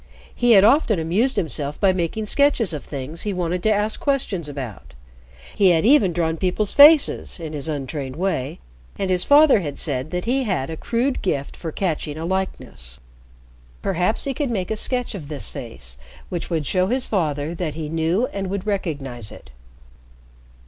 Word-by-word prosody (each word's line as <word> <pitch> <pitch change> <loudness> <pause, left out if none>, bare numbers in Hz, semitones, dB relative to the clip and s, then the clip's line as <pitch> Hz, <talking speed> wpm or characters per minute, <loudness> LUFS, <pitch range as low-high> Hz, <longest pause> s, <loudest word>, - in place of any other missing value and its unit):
He 240 -1 +4
had 195 -2 +7
often 225 -2 +4
amused 190 +11 +1
himself 150 -2 -2
by 195 -2 +4
making 185 +4 -2
sketches 250 - +2
of 150 - -5
things 145 +3 -6
he 205 - -2
wanted 180 0 -2
to 220 - +2
ask 210 +1 0
questions 210 - -1
about. 125 - -8 0.6
He 200 -3 +5
had 165 0 +3
even 230 -8 +5
drawn 165 -1 -1
people's 190 +4 -1
faces 295 - +6
in 160 -2 -6
his 150 +1 -2
untrained 140 -2 -4
way, 160 -7 -2 0.4
and 195 -1 -1
his 180 -1 +2
father 290 -4 +6
had 145 -6 -5
said 135 -2 -2
that 180 +2 -3
he 260 +3 +1
had 185 - -2
a - - -4
crude 245 - -1
gift 140 -7 -2
for 165 - -6
catching 155 -4 -2
a 160 - -4
likeness. 115 - -3 0.8
Perhaps 185 +3 0
he 275 - -1
could 280 +1 -2
make 195 -5 -2
a - - 0
sketch 250 +3 -1
of 170 -8 -7
this 145 -3 -4
face 65 - -6 0.3
which 175 -2 -4
would 160 -4 -1
show 185 +3 +1
his 255 +4 0
father 155 -5 -1
that 165 -4 -4
he 155 -1 -4
knew 165 +8 +1
and 195 -1 -3
would 200 0 -3
recognize 140 - -3
it. - - -13
180 Hz, 180 wpm, -22 LUFS, 150-210 Hz, 0.8 s, had